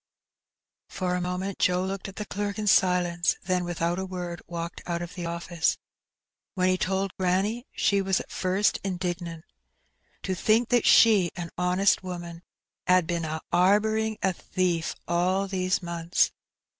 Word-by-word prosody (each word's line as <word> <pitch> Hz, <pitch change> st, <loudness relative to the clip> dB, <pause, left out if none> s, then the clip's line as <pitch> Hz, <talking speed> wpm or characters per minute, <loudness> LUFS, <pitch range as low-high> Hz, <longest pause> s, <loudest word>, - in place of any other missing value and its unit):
For 180 Hz, -1 st, -2 dB
a 180 Hz, -, -1 dB
moment 180 Hz, +2 st, -3 dB
Joe 180 Hz, +1 st, +2 dB
looked 195 Hz, +1 st, -4 dB
at 195 Hz, -, -10 dB
the 210 Hz, -, -5 dB
clerk 205 Hz, 0 st, -3 dB
in 215 Hz, -, -3 dB
silence, 180 Hz, -3 st, +3 dB
then, 180 Hz, 0 st, 0 dB
without 175 Hz, 0 st, -1 dB
a 190 Hz, -, -2 dB
word, 175 Hz, -2 st, -5 dB
walked 170 Hz, 0 st, -5 dB
out 170 Hz, 0 st, -2 dB
of 175 Hz, -, -8 dB
the 175 Hz, -3 st, -5 dB
office. 170 Hz, 0 st, -1 dB, 0.8 s
When 185 Hz, -1 st, +2 dB
he 185 Hz, -, +2 dB
told 190 Hz, 0 st, -1 dB
granny, 195 Hz, +7 st, 0 dB
she 200 Hz, -1 st, +2 dB
was 190 Hz, -1 st, +1 dB
at -, -, -9 dB
first 190 Hz, +3 st, +1 dB
indignant. 175 Hz, -3 st, -4 dB, 0.8 s
'^To 190 Hz, -, -1 dB
think 220 Hz, +5 st, +2 dB
that 245 Hz, -1 st, +3 dB
she, 205 Hz, -6 st, +6 dB
a 170 Hz, -1 st, -6 dB
honest 180 Hz, +2 st, +2 dB
woman, 175 Hz, -2 st, -7 dB, 0.5 s
'ad 180 Hz, -1 st, +4 dB
been 170 Hz, 0 st, -2 dB
a 160 Hz, 0 st, -4 dB
'arbouring 215 Hz, +4 st, +3 dB
a 190 Hz, -, +2 dB
thief 175 Hz, -2 st, -1 dB
all 185 Hz, +3 st, +1 dB
these 185 Hz, -1 st, 0 dB
months 170 Hz, 0 st, +1 dB
185 Hz, 155 wpm, -27 LUFS, 175-195 Hz, 0.8 s, she